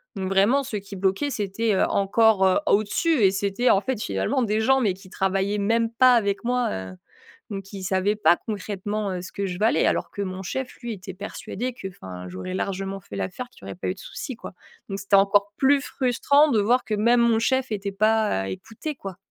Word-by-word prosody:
donc 190 -1 -3
vraiment, 200 +9 +3
ce 225 - -5
qui 200 0 -8
bloquait, 195 +9 0
c'était, 215 -1 -1
heu, - - +3
encore 200 +2 +3
au 210 +2 +4
dessus 295 +5 +1
et 190 - +6
c'était 200 +5 0
en 195 - +4
fait 255 -1 -2
finalement 100 - 0
des 215 -1 0
gens, 265 +4 +3
mais 205 -6 +2
qui 185 +1 -15
travaillaient 195 +2 0
même 225 +3 +1
pas 255 +1 +5
avec 205 -3 0
moi, 245 0 +1
heu, 95 0 -5 0.6
donc 195 -1 -5
qui 195 -1 -9
savaient 190 +2 +1
pas 175 -4 +4
concrètement, 205 0 -3
heu, 180 - -3
ce 180 - -9
que 200 - -2
je 180 -1 -5
valais 220 +2 +3
alors - - 0
que 200 - -4
mon 185 0 -5
chef, 260 +7 -4
lui, 240 -2 -4
était 195 -1 -8
persuadé 235 +5 -5
qu'enfin, 95 - -8
j'aurais 95 - -6
largement 195 0 -3
fait 100 - -12
l'affaire. 100 - -4
Qu'il - - -21
y - - -11
aurait - - -6
pas 180 - -5
eu 185 - -1
de - - -21
soucis 255 +3 -7
quoi, 230 - -10 0.3
donc 195 - -4
c'était 200 0 +3
encore 200 +1 +3
plus 280 +1 +4
frustrant 280 +3 +2
de 220 - +3
voir 245 +5 +2
que 215 - -2
même 235 +3 +3
mon 235 -1 +4
chef 260 0 0
était 200 -1 -2
pas, 215 - +2
heu, 95 - -4
écouté, 225 - -6
quoi. 195 -8 -8
205 Hz, 220 wpm, -24 LUFS, 190-230 Hz, 0.6 s, et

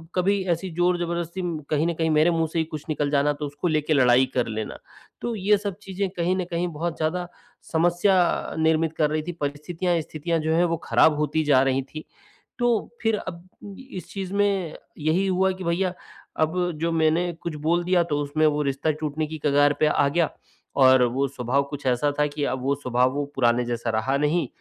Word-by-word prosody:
कभी 195 +2 +2
ऐसी 170 +3 -1
ज़ोर-ज़बरदस्ती 175 0 -1 0.3
कहीं 150 +1 +1
न 170 - 0
कहीं 160 0 -1
मेरे 155 +2 +4
मुँह 165 -1 +1
से 165 - -1
ही 160 - +1
कुछ 155 -2 -7
निकल 145 -2 0
जाना 145 0 +2
तो 150 +1 -5
उसको 145 +4 -3
लेके 155 -1 +1
लड़ाई 130 -1 +5
कर 125 -2 0
लेना। 110 -1 -4 0.4
तो 240 - -2
ये 205 +1 +3
सब 200 -2 -4
चीज़ें 195 0 -3
कहीं 175 +2 +1
न 185 - -1
कहीं 175 +1 0
बहुत 165 +2 -3
ज़्यादा 175 +3 -1 0.4
समस्या 175 +2 +2
निर्मित 160 0 +2
कर 150 -1 +2
रही 155 +1 -1
थीं। 175 - -5
परिस्थितियाँ 165 +4 -1
स्थितियाँ 165 +2 -2
जो 160 +1 0
हैं 175 - +4
वो 165 -1 0
ख़राब 155 - +4
होती 155 +1 0
जा 140 -3 +4
रही 135 0 +1
थीं। 155 +3 -9 0.6
तो, 240 -3 +1
फिर 225 -2 +2
अब 175 -1 -8 0.4
इस 180 - -7
चीज़ 195 -1 -5
में 200 -5 0 0.2
यही 160 +5 +1
हुआ 190 0 +2
कि 185 0 -7
भईया 180 +2 0 0.5
अब 175 +3 +1
जो 170 0 +1
मैंने 165 +2 +2
कुछ 170 -3 -4
बोल 175 +1 +2
दिया 180 0 +3
तो 145 - +1
उसमें 145 +2 0
वो 150 0 +1
रिश्ता 140 +3 0
टूटने 155 0 -2
की 155 +1 -6
कगार 145 0 +4
पे 155 - +4
आ 145 -1 +3
गया, 160 +2 +1 0.5
और 130 -2 +6
वो 130 +3 +1
स्वभाव 135 +1 0
कुछ 140 -2 -7
ऐसा 130 +4 +2
था 150 - +4
कि 145 0 -4
अब 130 - -2
वो 140 +1 +2
स्वभाव 125 -2 +1
वो 145 +1 -1
पुराने 120 -1 +2
जैसा 120 -1 -3
रहा 110 +5 0
नहीं, 150 +4 +1
160 Hz, 205 wpm, -24 LUFS, 145-175 Hz, 0.6 s, और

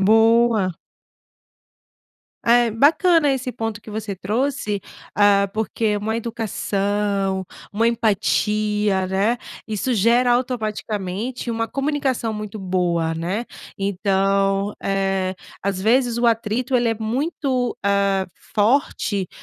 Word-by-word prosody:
Boa. 225 -1 +4 1.7
É, 235 0 +4
bacana 295 - +4
esse 260 -1 -2
ponto 225 -3 -4
que 220 - -12
você 210 -1 -4
trouxe, 215 +2 -1 0.4
hã, 200 -1 +4
porque 220 -1 -1
uma 220 +2 -2
educação, 205 -4 -1 0.3
uma 225 +3 +2
empatia, 210 -3 +1
né, 200 +5 +1 0.3
isso 220 +4 -1
gera 235 +3 +3
automaticamente 220 -2 -2
uma 225 0 -1
comunicação 270 -3 -1
muito 210 0 -6
boa, 175 -4 0
né? 180 +8 -2 0.3
Então, 195 0 +1
eh, 195 -1 0 0.3
às 195 -1 -1
vezes 235 +3 +2
o 240 - +2
atrito 230 +3 +1
ele 240 -1 +2
é 225 - +1
muito, 255 +2 -1
hã, 200 -1 +2 0.3
forte 205 -4 +1
215 Hz, 105 wpm, -21 LUFS, 195-235 Hz, 1.7 s, Boa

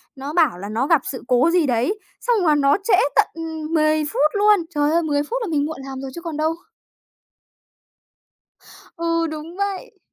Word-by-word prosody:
nó 275 +3 -6
bảo 315 - +3
là 200 +3 -7
nó 235 +6 -1
gặp 325 -5 +4
sự 260 - -7
cố 250 +6 +3
gì 345 -3 +3
đấy, 255 - 0 0.2
xong 455 -7 +1
là 305 -2 +4
nó 280 +2 +3
trễ 425 -4 +4 0.2
tận, - - +4
ừm, 320 -1 -6
10 310 -1 +2
phút 300 0 +1
luôn! 415 -1 +4 0.2
Trời 295 0 +2
ơi, 335 +1 +2
10 290 -2 0
phút 470 +12 -3
là 450 - -2
mình 290 -2 +1
muộn 315 -2 -5
làm 270 -1 -7
rồi 270 -1 -6
chứ 340 - -7
còn 330 -3 -5
đâu! 315 +1 +1 2.4
Ừ, 335 0 0
đúng 310 +3 -7
vậy! 400 -1 -4
310 Hz, 195 wpm, -21 LUFS, 285-335 Hz, 2.4 s, gặp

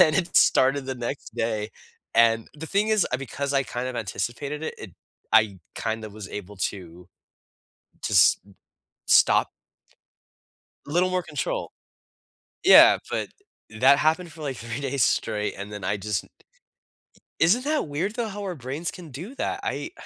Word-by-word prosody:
And 155 - +6
it 180 -2 -1
started 135 +1 +4
the 130 - -3
next 120 -1 -5
day. 110 -2 -2 0.4
And 115 -1 +4
the 160 +2 -8
thing 205 +4 +1
is, 215 -3 +3
I - - +2
because 140 +2 -4
I 135 - +3
kind 125 +1 -4
of 130 - -5
anticipated 120 +9 -4
it, - - -4
it 105 - -9 0.4
I 105 -4 +4 0.2
kinda 110 -1 -3
was 105 -2 -9
able 105 0 -8 0.2
to 90 -2 -12 1.0
to - - -2
s - - +6 0.7
stop. - - +5 1.4
Little 175 +5 +1
more 185 -1 0
control. - - -4 0.9
Yeah, - - +9
but - - -2 0.5
that 140 +2 +6
happened 160 +1 +1
for, 160 0 -11
like, 135 -4 -3
three 115 +4 -6
days 135 -4 +1
straight, 105 0 0
and 100 +2 -7
then 105 -3 -7
I 100 +2 0
just 100 -2 -2 1.2
isn't 205 +11 +4
that 305 - 0
weird, 175 +10 -2
though, 235 -2 -2
how 205 +1 -7
our 185 -3 -4
brains 140 +6 -4
can 170 -4 -11
do 180 - -8
that, - - -2
I - - -3
135 Hz, 160 wpm, -25 LUFS, 110-165 Hz, 1.4 s, Yeah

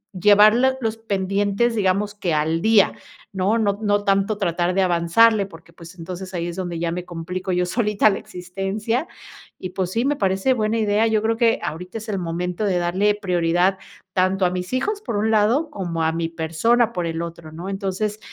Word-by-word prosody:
llevar 210 +3 +6
l 260 +2 +2
los 225 -3 -2
pendientes, 200 +2 0
digamos 200 0 0
que 180 -6 -2
al 160 +2 0
día, 220 -1 +4 0.4
¿no?, 195 +3 +1
no 205 -3 0
no 205 -1 +1
tanto 195 +1 +1
tratar 175 0 0
de 195 - +3
avanzarle, 190 +5 +3
porque 165 -3 -16
pues, 170 +1 -13
entonces 185 +2 -7
ahí 170 -1 -2
es 170 - -5
donde 175 -2 -4
ya 165 0 -1
me 175 +1 -4
complico 180 +2 -5
yo 180 0 +1
solita 210 +1 +2
la - - -3
existencia 195 - -3 0.5
y 185 - -6
pues 185 -1 -2
sí, 230 +5 0
me 290 +1 +1
parece 195 +2 +1
buena 220 -2 0
idea, 215 0 +2
yo 220 -1 +1
creo 225 +1 +1
que 230 -1 +3
ahorita 180 +6 -5
es 220 0 -8
el 200 -2 -1
momento 175 +3 -3
de 190 -3 +1
darle 185 +4 +1
prioridad 180 -1 +1 0.3
tanto 185 +1 +2
a 180 - +1
mis 180 0 -4
hijos 405 +11 -1
por 230 - -3
un 220 +2 +1
lado, 230 +9 +2
como 170 - -3
a 160 - +2
mi 165 0 -2
persona 195 +9 +1
por 175 -2 -2
el 165 0 -3
otro, 170 -2 -8
¿no?, 170 +4 -8
entonces 195 +2 -3
195 Hz, 200 wpm, -22 LUFS, 175-215 Hz, 0.5 s, llevar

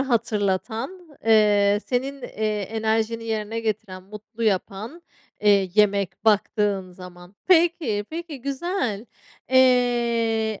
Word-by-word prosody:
hatırlatan, 230 - -2 0.2
eee, 210 -2 +4
senin, 270 +2 -2
eee, 215 -2 -2
enerjini 220 +2 -1
yerine 220 0 -3
getiren, 210 -4 -4
mutlu 215 +4 -10
yapan, 215 - -2 0.4
eee, 200 -3 +3
yemek 200 -2 +1
baktığın 205 -3 +1
zaman. 180 +1 -13
Peki, 330 - +3
peki, 325 -4 -6
güzel. 270 - -3 0.4
Eee, 235 -4 +2
220 Hz, 95 wpm, -23 LUFS, 205-245 Hz, 0.4 s, eee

